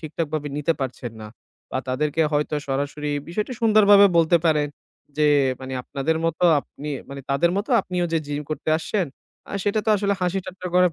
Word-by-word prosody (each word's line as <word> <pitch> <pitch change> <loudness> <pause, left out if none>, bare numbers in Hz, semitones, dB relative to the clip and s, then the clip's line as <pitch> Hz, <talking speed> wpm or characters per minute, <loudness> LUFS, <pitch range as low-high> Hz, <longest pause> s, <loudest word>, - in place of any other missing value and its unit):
ঠিকঠাকভাবে 155 -2 -3
নিতে 150 +3 +1
পারছেন 125 -2 -4
না 110 - -7 0.4
বা - - -1
তাদেরকে 150 +4 0
হয়তো 150 +1 0
সরাসরি 145 +2 -2 0.2
বিষয়টি 210 +8 -3
সুন্দরভাবে 205 -2 +7
বলতে 170 +1 +5
পারেন 150 -2 +3 0.5
যে, 150 - +4 0.3
মানে 130 0 -7
আপনাদের 145 +5 -1
মত 165 -1 0 0.2
আপনি, 150 +2 -9 0.2
মানে 140 0 -7
তাদের 140 +5 +3
মত 205 - -1
আপনিও 180 -1 -2
যে 165 - +3
gym 145 0 -3
করতে 155 - -4
আসছেন 180 +2 -1 0.4
আ - - -8
সেটা 205 +1 +1
তো - - +4
আসলে 200 0 +1
হাসি 180 +1 0
ঠাট্টা 185 -1 -7
করার 180 -2 +4
160 Hz, 175 wpm, -23 LUFS, 145-185 Hz, 0.5 s, সুন্দরভাবে